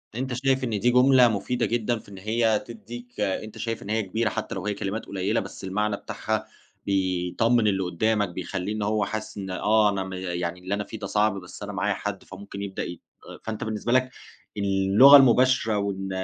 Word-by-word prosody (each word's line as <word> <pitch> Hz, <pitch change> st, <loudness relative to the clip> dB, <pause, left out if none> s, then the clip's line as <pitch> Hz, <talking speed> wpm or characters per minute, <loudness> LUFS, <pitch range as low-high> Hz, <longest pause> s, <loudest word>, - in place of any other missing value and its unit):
أنت 130 Hz, +1 st, -3 dB
شايف 130 Hz, +1 st, +1 dB
إن 125 Hz, -, -1 dB
دي 120 Hz, +5 st, +3 dB
جملة 125 Hz, 0 st, +6 dB
مفيدة 120 Hz, +3 st, -1 dB
جدًا، 120 Hz, 0 st, 0 dB
في -, -, -17 dB
إن 95 Hz, -, -10 dB
هي 110 Hz, +2 st, +1 dB
تديك 120 Hz, +2 st, -10 dB
أنت 105 Hz, +2 st, -2 dB
شايف 115 Hz, 0 st, -4 dB
إن 100 Hz, -, -9 dB
هي 110 Hz, +1 st, +1 dB
كبيرة 110 Hz, +3 st, -1 dB
حتى -, -, -4 dB
لو -, -, -5 dB
هي 105 Hz, -, 0 dB
كلمات 100 Hz, +2 st, -4 dB
قليلة، 100 Hz, +3 st, -1 dB
بس -, -, -8 dB
المعنى 105 Hz, +2 st, -1 dB
بتاعها -, -, -3 dB, 0.4 s
بيطمن 95 Hz, +4 st, +1 dB
اللي 95 Hz, -2 st, +1 dB
قدامك، 105 Hz, +3 st, 0 dB
بيخلّيه 95 Hz, +3 st, -4 dB
إن 110 Hz, -, -4 dB
هو 105 Hz, +1 st, +1 dB
حاسس 110 Hz, 0 st, -5 dB
إن 95 Hz, -1 st, -5 dB
آه، 105 Hz, +3 st, +3 dB
أنا 95 Hz, -2 st, -1 dB
م 95 Hz, -, -7 dB
يعني 90 Hz, -1 st, -3 dB
اللي 95 Hz, +2 st, -4 dB
أنا 105 Hz, 0 st, -1 dB
فيه 110 Hz, +1 st, -9 dB
ده 100 Hz, -, -5 dB
صعب 105 Hz, +1 st, +2 dB
بس 90 Hz, -, -10 dB
أنا -, -, -6 dB
معايا -, -, 0 dB
حد، -, -, -5 dB
فممكن 100 Hz, +1 st, -9 dB
يبدأ 95 Hz, -1 st, -4 dB
ي 85 Hz, -, -7 dB, 0.4 s
فأنت 110 Hz, -1 st, -4 dB
بالنسبة 110 Hz, +1 st, -3 dB
لك 130 Hz, +1 st, +3 dB, 0.5 s
اللغة 100 Hz, +7 st, +7 dB
المباشرة 130 Hz, -4 st, +4 dB
وإن 95 Hz, -1 st, -2 dB
105 Hz, 200 wpm, -25 LUFS, 95-115 Hz, 0.5 s, اللغة